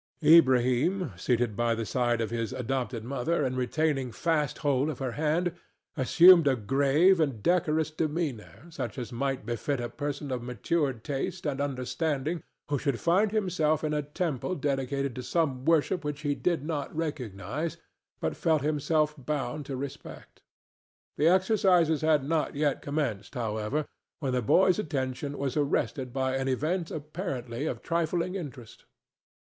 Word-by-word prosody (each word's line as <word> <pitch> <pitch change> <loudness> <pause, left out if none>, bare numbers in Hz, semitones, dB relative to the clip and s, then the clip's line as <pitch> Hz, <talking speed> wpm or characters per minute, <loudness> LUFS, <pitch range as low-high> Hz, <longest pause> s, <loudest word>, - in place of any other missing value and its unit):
Ilbrahim, 145 - +4
seated 120 +3 0
by 120 0 +1
the 115 0 -3
side 120 0 0
of 110 -1 -2
his 115 -2 -2
adopted 125 -2 -2
mother 140 +6 -1
and 130 0 -1
retaining 135 +1 0
fast 150 +2 0
hold 140 +1 +2
of 150 - -4
her 130 -2 -3
hand, 160 +6 0 0.4
assumed 170 +4 +7
a 135 - +4
grave 140 - +3
and 135 -9 0
decorous 160 -3 +2
demeanor 155 -5 -3
such 120 -7 -5
as 125 -1 -5
might 135 -1 -2
befit 120 +4 -2
a 120 0 -3
person 145 +2 -4
of 125 -2 -2
matured 125 +1 -1
taste 160 +6 -3
and 140 -2 -1
understanding 145 +3 -2 0.3
who 145 -2 0
should 140 -4 -1
find 195 +5 +3
himself 165 -8 +1
in 155 -1 0
a 150 - +1
temple 150 +2 -2
dedicated 140 -2 -1
to 125 - -5
some 135 -2 -1
worship 165 +2 +2
which 150 0 -4
he 145 -1 0
did 165 -1 -1
not 155 -3 -3
recognize, 140 - -3 0.4
but - - -2
felt 160 -4 +1
himself 150 +1 +1
bound 145 0 -3
to 135 - -4
respect. 140 +1 -8 0.7
The 150 - +3
exercises 185 -4 +3
had 155 -3 +3
not 160 -2 0
yet 145 -1 0
commenced, 130 -10 -3
however, 115 +5 -2 0.3
when 135 -4 -2
the 125 - +1
boy's 185 - +4
attention 140 -4 -3
was 135 -2 -2
arrested 140 -3 0
by 130 0 0
an 135 0 -2
event 160 +7 -1
apparently 145 -5 -4
of - - -4
trifling 170 +1 0
interest. 135 - -8
145 Hz, 155 wpm, -28 LUFS, 125-160 Hz, 0.7 s, assumed